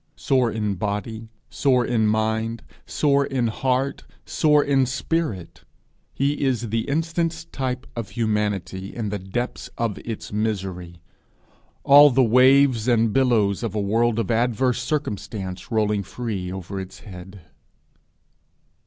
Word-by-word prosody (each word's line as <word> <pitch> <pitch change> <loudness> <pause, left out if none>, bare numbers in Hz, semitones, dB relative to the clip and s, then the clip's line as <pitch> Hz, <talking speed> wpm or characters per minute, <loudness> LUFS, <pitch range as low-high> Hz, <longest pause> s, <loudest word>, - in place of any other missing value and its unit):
Sore 130 -4 +1
in 105 -2 -1
body, 105 +3 -4 0.2
sore 125 -3 +1
in 110 -3 +1
mind, 110 +1 -1 0.2
sore 140 -2 +2
in 130 -4 -1
heart, 130 +4 -1 0.2
sore 150 -2 +3
in 135 -2 +2
spirit, 120 - -3 0.5
he 140 +2 -1
is 120 -4 0
the 115 +3 -2
instance 165 +2 -1
type 130 -2 -4
of 115 -3 -5
humanity 105 -4 -2
in 110 -3 -3
the 105 0 -3
depths 95 +7 -4
of 115 -4 -2
its 115 -2 -7
misery 95 -6 -3 0.8
all 145 +1 +8
the 130 0 +3
waves 130 0 +4
and 115 -3 +2
billows 115 -7 +2
of 115 -3 -4
a - - 0
world 115 +3 +1
of 115 +1 -1
adverse 125 +2 +1
circumstance 105 -9 -4
rolling 105 -2 +1
free 100 -3 -5
over 95 +1 -6
its 95 -1 -9
head. 95 -1 -11
115 Hz, 130 wpm, -23 LUFS, 105-130 Hz, 0.8 s, all